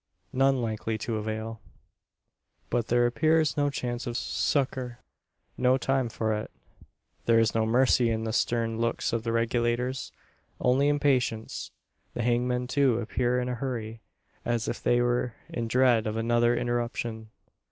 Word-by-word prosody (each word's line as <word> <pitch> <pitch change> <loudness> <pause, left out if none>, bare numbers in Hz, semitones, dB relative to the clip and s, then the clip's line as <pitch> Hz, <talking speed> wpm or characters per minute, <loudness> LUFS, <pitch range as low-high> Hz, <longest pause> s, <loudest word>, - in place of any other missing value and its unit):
None 135 -1 +3
likely 110 0 -2
to 110 +1 -3
avail. 110 +1 -4 1.1
But 120 -2 0
there 120 0 +3
appears 155 +5 +2
no 145 -1 +2
chance 125 -2 -4
of 120 0 -2
succour 130 -5 -1 0.6
no 125 +1 +4
time 135 -2 0
for 110 -1 -1
it. 105 0 -3 0.8
There 115 -1 +5
is 115 -1 +3
no 110 -1 +1
mercy 125 0 +4
in 110 0 -1
the 110 -1 -2
stern 115 -1 0
looks 115 0 -1
of 115 - 0
the 115 0 -2
Regulators 120 +2 0 0.5
only 130 +3 +3
impatience. 130 -6 0 0.5
The 120 - -1
hangmen, 125 +1 +1
too, 130 -2 +2
appear 120 +2 0
in 125 - -2
a 125 - -1
hurry 115 -3 -4 0.4
as 120 -1 -1
if - - -3
they 120 0 +3
were 120 -1 0
in 115 -1 -3
dread 120 -2 +3
of 110 +1 -2
another 120 +1 +2
interruption. 120 -2 -2
120 Hz, 150 wpm, -28 LUFS, 115-125 Hz, 1.1 s, There